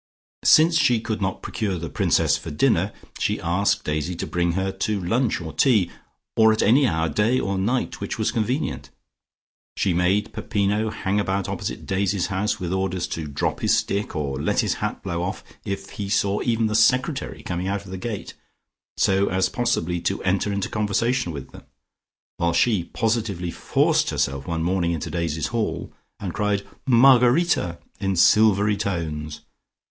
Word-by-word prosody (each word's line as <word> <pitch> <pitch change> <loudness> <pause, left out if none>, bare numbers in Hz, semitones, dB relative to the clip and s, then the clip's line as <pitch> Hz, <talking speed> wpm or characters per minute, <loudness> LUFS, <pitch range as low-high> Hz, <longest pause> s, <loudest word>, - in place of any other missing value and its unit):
Since 165 +1 +6
she 125 -5 +3
could 110 -1 -4
not 95 0 -2
procure 100 -5 -2
the 85 0 -5
Princess - - +2
for - - -6
dinner, 75 - +2 0.3
she - - 0
asked 100 +4 +1
Daisy 75 +3 -2
to - - -4
bring 85 -1 0
her 95 +1 -1
to 100 +2 -2
lunch 115 +6 0
or 80 -2 -7
tea 110 -10 +3 0.4
or 110 0 +6
at 110 - +1
any 130 +5 +5
hour 80 -3 0
day 110 - +1
or 100 0 -1
night 120 +7 -1
which - - -4
was - - 0
convenient. 120 +6 -2 0.9
She 95 - +1
made 95 +5 +1
Peppino 105 0 0
hang 105 -2 -1
about 100 -1 -1
opposite - - -4
Daisy's 95 -1 0
house, 105 +4 -1
with 90 -1 -3
orders 95 -2 -1
to 80 -2 -4
drop 70 - -2
his - - +3
stick, 100 -1 -2
or 70 -3 -2
let - - +1
his - - 0
hat - - -3
blow 85 0 -3
off, 90 +2 -4 0.2
if 100 0 -5
he 100 -1 -5
saw 100 0 +1
even 115 -1 +1
the 105 - 0
secretary 130 +6 +1
coming 90 +1 -3
out 100 0 -2
of 95 - -10
the 95 - -4
gate, 105 0 -5 0.6
so 95 +1 +2
as 95 0 +1
possibly 90 -8 -1
to 95 - -2
enter 95 +2 +1
into 100 -1 -1
conversation 110 +1 0
with 70 -4 -8
him, - - -11 0.8
while 85 0 +1
she 95 -1 +2
positively 110 -7 -1
forced - - +1
herself 70 0 -1
one 80 -1 -2
morning 85 -1 +1
into 80 - -4
Daisy's 80 -3 -2
hall, 115 -2 -2 0.3
and 95 -4 -4
cried 105 -2 -1 0.2
"Margarita" 125 - +4 0.2
in 95 -1 -1
silvery 105 +2 +4
tones. 80 -6 -3
100 Hz, 170 wpm, -23 LUFS, 85-110 Hz, 0.9 s, Since